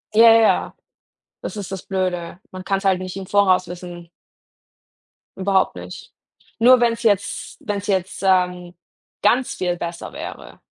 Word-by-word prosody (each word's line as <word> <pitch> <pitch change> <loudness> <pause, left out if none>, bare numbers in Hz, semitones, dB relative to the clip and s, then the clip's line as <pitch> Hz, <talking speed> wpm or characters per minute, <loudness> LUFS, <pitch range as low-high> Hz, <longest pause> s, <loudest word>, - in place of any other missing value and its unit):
Ja, 230 +1 +8
ja. 225 -1 +3 0.7
Das - - -6
ist 200 -2 -6
das 190 -1 -5
Blöde. 185 -2 -3
Man 185 0 -8
kann's 195 +1 -2
halt 190 -1 +3
nicht 185 0 -6
im 195 - -6
Voraus 185 -2 +3
wissen. 175 -1 -9 1.3
Überhaupt 190 0 +1
nicht. - - -10 0.5
Nur 250 +2 +6
wenn's 235 0 +1
jetzt 205 -3 0
wenn's 205 0 -4
jetzt, 190 -2 -1
ähm, 180 -2 +1 0.5
ganz 245 +5 +2
viel 180 -1 -2
besser 170 0 -6
wäre. - - -9
190 Hz, 140 wpm, -21 LUFS, 180-205 Hz, 1.3 s, Ja